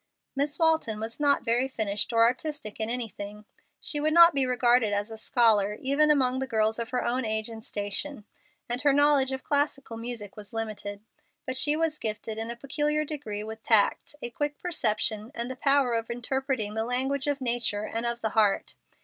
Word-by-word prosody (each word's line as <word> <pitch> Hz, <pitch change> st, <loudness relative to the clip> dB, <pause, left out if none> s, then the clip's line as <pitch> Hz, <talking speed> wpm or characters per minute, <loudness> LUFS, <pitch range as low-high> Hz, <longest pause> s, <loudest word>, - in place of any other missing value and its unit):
Miss 285 Hz, +1 st, -1 dB
Walton 320 Hz, -10 st, +2 dB
was 225 Hz, +3 st, -5 dB
not 285 Hz, -1 st, +3 dB
very 240 Hz, +3 st, +2 dB
finished 215 Hz, -5 st, -2 dB
or 230 Hz, -1 st, +4 dB
artistic 250 Hz, -1 st, -2 dB
in 220 Hz, 0 st, -1 dB
anything. 210 Hz, -3 st, -5 dB, 0.3 s
She 295 Hz, -, -2 dB
would 310 Hz, +1 st, +1 dB
not 340 Hz, 0 st, +9 dB
be 270 Hz, -2 st, +2 dB
regarded 245 Hz, -3 st, +3 dB
as 205 Hz, +2 st, -2 dB
a -, -, -6 dB
scholar, 210 Hz, -4 st, +2 dB
even 280 Hz, +3 st, +2 dB
among 260 Hz, -3 st, +3 dB
the 265 Hz, -, -3 dB
girls 220 Hz, -1 st, +1 dB
of 230 Hz, 0 st, -4 dB
her 250 Hz, -1 st, -1 dB
own 250 Hz, +2 st, 0 dB
age 220 Hz, 0 st, -1 dB
and 220 Hz, -1 st, -9 dB
station, 210 Hz, +5 st, -4 dB, 0.4 s
and 245 Hz, +2 st, -2 dB
her 285 Hz, -1 st, +4 dB
knowledge 285 Hz, -2 st, +4 dB
of 265 Hz, 0 st, -4 dB
classical 285 Hz, -5 st, -1 dB
music 230 Hz, -3 st, -6 dB
was 210 Hz, +1 st, -9 dB
limited. 215 Hz, -2 st, -5 dB, 0.4 s
But 260 Hz, -, -3 dB
she 295 Hz, +3 st, +3 dB
was 315 Hz, -1 st, -1 dB
gifted 215 Hz, 0 st, -3 dB
in 225 Hz, +1 st, -3 dB
a 235 Hz, -, -4 dB
peculiar 295 Hz, +4 st, -1 dB
degree 270 Hz, -9 st, -5 dB
with 220 Hz, +1 st, -8 dB
tact, 220 Hz, +5 st, +2 dB
a 240 Hz, -, -4 dB
quick 290 Hz, +3 st, -3 dB
perception, 220 Hz, -9 st, 0 dB
and 235 Hz, +2 st, -3 dB
the -, -, -6 dB
power 275 Hz, -2 st, +2 dB
of 230 Hz, 0 st, -2 dB
interpreting 245 Hz, -2 st, -2 dB
the 220 Hz, 0 st, -1 dB
language 265 Hz, +4 st, -1 dB
of 285 Hz, -1 st, 0 dB
nature 235 Hz, -4 st, 0 dB
and 225 Hz, +2 st, -3 dB
of 235 Hz, 0 st, -1 dB
the 220 Hz, -, 0 dB
heart. 210 Hz, -2 st, +2 dB
240 Hz, 195 wpm, -27 LUFS, 220-280 Hz, 0.4 s, not